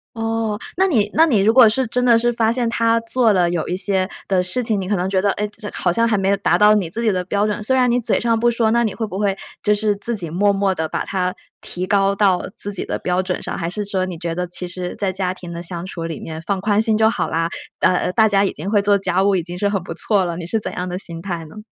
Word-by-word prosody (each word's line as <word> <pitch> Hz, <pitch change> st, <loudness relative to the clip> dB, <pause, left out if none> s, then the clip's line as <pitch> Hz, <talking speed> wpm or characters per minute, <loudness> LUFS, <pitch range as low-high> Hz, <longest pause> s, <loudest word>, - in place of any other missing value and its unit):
哦， 225 Hz, -1 st, -2 dB, 0.2 s
那 380 Hz, +1 st, +3 dB
你 215 Hz, -, +2 dB
那 320 Hz, -, +5 dB
你 235 Hz, -10 st, +3 dB
如 215 Hz, +3 st, +4 dB
果 235 Hz, -3 st, +8 dB
是 260 Hz, +4 st, 0 dB
真 250 Hz, +2 st, -1 dB
的 240 Hz, -2 st, +5 dB
是 240 Hz, +1 st, +1 dB
发 225 Hz, -1 st, +2 dB
现 240 Hz, 0 st, -1 dB
她 230 Hz, 0 st, +2 dB
做 230 Hz, -1 st, +2 dB
了 175 Hz, -2 st, +2 dB
有 175 Hz, -2 st, -2 dB
一 180 Hz, -, -2 dB
些 190 Hz, 0 st, 0 dB, 0.2 s
的 190 Hz, -2 st, +2 dB
事 185 Hz, +8 st, -1 dB
情， 220 Hz, -3 st, +1 dB
你 185 Hz, -, -5 dB
可 205 Hz, -, +2 dB
能 180 Hz, +1 st, -1 dB
觉 190 Hz, -1 st, +1 dB
得， 205 Hz, -, +2 dB
哎， 210 Hz, 0 st, -2 dB
这 210 Hz, 0 st, -9 dB
好 175 Hz, -, 0 dB
像 230 Hz, +6 st, +2 dB
还 215 Hz, -, +1 dB
没 195 Hz, 0 st, 0 dB
有 200 Hz, -, +2 dB
达 200 Hz, -, +2 dB
到 210 Hz, 0 st, +6 dB
你 195 Hz, -6 st, 0 dB
自 230 Hz, +8 st, -4 dB
己 220 Hz, -, +3 dB
的 180 Hz, -1 st, -1 dB
标 200 Hz, +3 st, 0 dB
准， 210 Hz, 0 st, -2 dB
虽 260 Hz, +5 st, +1 dB
然 250 Hz, -1 st, +3 dB
你 245 Hz, +1 st, +2 dB
嘴 235 Hz, -, 0 dB
上 230 Hz, -1 st, +1 dB
不 240 Hz, +1 st, +3 dB
说， 230 Hz, -2 st, +1 dB
那 235 Hz, 0 st, +3 dB
你 220 Hz, -, -2 dB
会 225 Hz, -, -2 dB
不 195 Hz, -1 st, -6 dB
会 200 Hz, -2 st, 0 dB, 0.2 s
就 210 Hz, 0 st, +2 dB
是 210 Hz, 0 st, 0 dB
自 230 Hz, +4 st, -2 dB
己 175 Hz, -6 st, -3 dB
默 200 Hz, +5 st, +2 dB
默 195 Hz, -1 st, +1 dB
地 160 Hz, -2 st, -2 dB
把 -, -, -3 dB
它 185 Hz, -2 st, -2 dB, 0.3 s
提 180 Hz, +1 st, -5 dB
高 200 Hz, 0 st, +2 dB
到 195 Hz, -3 st, +2 dB
自 205 Hz, 0 st, -4 dB
己 185 Hz, -, -2 dB
的 -, -, -3 dB
标 180 Hz, +1 st, 0 dB
准 185 Hz, -, -3 dB
上， -, -, -4 dB
还 170 Hz, -1 st, -2 dB
是 205 Hz, +2 st, -4 dB
说 190 Hz, -2 st, -1 dB
你 175 Hz, -, -6 dB
觉 170 Hz, 0 st, -4 dB
得， 180 Hz, +1 st, -3 dB
其 180 Hz, +1 st, -6 dB
实 180 Hz, 0 st, -5 dB
在 195 Hz, -2 st, -1 dB
家 185 Hz, -1 st, -1 dB
庭 175 Hz, -2 st, -9 dB
的 170 Hz, -, -6 dB
相 175 Hz, 0 st, -5 dB
处 170 Hz, -3 st, -6 dB
里 165 Hz, -2 st, -5 dB
面 160 Hz, 0 st, -7 dB
放 190 Hz, +3 st, -2 dB
宽 210 Hz, +1 st, +2 dB
心 220 Hz, -1 st, +2 dB
就 220 Hz, 0 st, +4 dB
好 240 Hz, -, -2 dB
啦， 165 Hz, +1 st, 0 dB, 0.3 s
呃 -, -, +4 dB
呃， 180 Hz, -, 0 dB
大 220 Hz, +3 st, +4 dB
家 200 Hz, -1 st, +3 dB
已 195 Hz, -, +1 dB
经 190 Hz, +7 st, -5 dB
会 205 Hz, -2 st, +3 dB
做 200 Hz, 0 st, +3 dB
家 190 Hz, 0 st, 0 dB
务， 200 Hz, -1 st, +3 dB
已 175 Hz, -, 0 dB
经 175 Hz, +1 st, -7 dB
是 205 Hz, -, +1 dB
很 195 Hz, -4 st, -2 dB
不 -, -, -6 dB
错 205 Hz, -4 st, +1 dB
了， 170 Hz, -1 st, -3 dB
你 170 Hz, -, -6 dB
是 225 Hz, +4 st, 0 dB
怎 -, -, -5 dB
样 180 Hz, 0 st, -4 dB
的 180 Hz, -, -3 dB
心 170 Hz, -3 st, -3 dB
态 170 Hz, -4 st, -5 dB
呢？ 185 Hz, +8 st, -13 dB
200 Hz, 330 characters per minute, -20 LUFS, 180-220 Hz, 0.3 s, 果